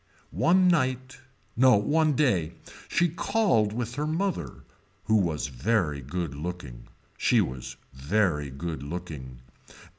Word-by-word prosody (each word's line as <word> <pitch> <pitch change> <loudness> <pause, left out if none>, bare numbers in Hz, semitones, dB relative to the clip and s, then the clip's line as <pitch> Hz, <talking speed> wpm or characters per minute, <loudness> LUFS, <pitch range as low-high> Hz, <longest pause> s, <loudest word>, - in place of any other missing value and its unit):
One 185 +3 +4
night, 130 -6 0 0.4
no 130 +1 +6
one 150 +9 +2
day 95 - +1 0.3
she 175 - +2
called 165 - +1
with 120 +1 -4
her 150 +3 -2
mother. 185 +4 -2 0.4
Who 110 - +3
was 85 -7 0
very 75 - 0
good 80 +3 -4
looking. 75 -5 -7 0.3
She - - +3
was 65 -1 -3 0.2
very 75 +1 0
good 80 +2 -5
looking. 70 -6 -7
100 Hz, 120 wpm, -27 LUFS, -, 0.4 s, no